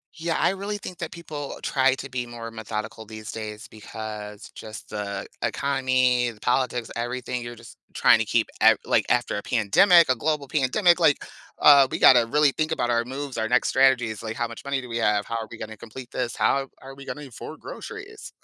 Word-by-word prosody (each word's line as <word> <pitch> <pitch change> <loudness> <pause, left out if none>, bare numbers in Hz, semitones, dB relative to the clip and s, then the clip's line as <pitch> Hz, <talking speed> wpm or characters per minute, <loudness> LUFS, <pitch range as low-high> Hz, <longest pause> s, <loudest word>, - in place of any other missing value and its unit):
Yeah, 165 0 -2
I - - +3
really 200 +2 -4
think 180 -3 -8
that 170 - -5
people 155 -4 -7
try 135 -1 +2
to 140 +1 -8
be 125 -1 -3
more 120 -1 -8
methodical 110 0 -6
these 110 0 -8
days 110 0 -7
because 105 -1 -8
just 110 0 -9
the 100 -2 -5 0.2
economy, 130 -3 +1
the 110 - -17
politics, 125 0 0
everything, 125 +1 -3
you're 120 0 -7
just 115 0 -14 0.2
trying - - +5
to 110 - 0
keep 115 +1 +1
ev - - +6
like - - +2
after 120 -3 +1
a 100 - -5
pandemic, 165 - +5
a 130 - +4
global 145 +3 -1
pandemic, 160 +7 +3
like, 155 -4 +3 0.4
uh, 140 -2 +7
we - - -2
gotta 120 -3 +7
really 150 +4 +3
think 155 +3 -2
about 120 -6 0
our 115 -1 +2
moves, 135 +1 -6
our 110 - 0
next 125 +1 +2
strategies, 125 -5 +2
like, 110 0 -4
how 120 - -1
much 115 0 -10
money 140 -1 -1
do 125 - -10
we 115 - -3
have? 105 -3 +1
How 115 - -4
are 110 -1 -3
we 115 - -8
gonna 110 0 -7
complete 120 +3 -10
this? 125 -3 -3
How 135 -1 +1
are 135 0 -10
we 140 0 -12
gonna 150 +1 -6
afford 135 +5 -10
groceries? 435 -2 -9
125 Hz, 210 wpm, -25 LUFS, 110-140 Hz, 0.4 s, uh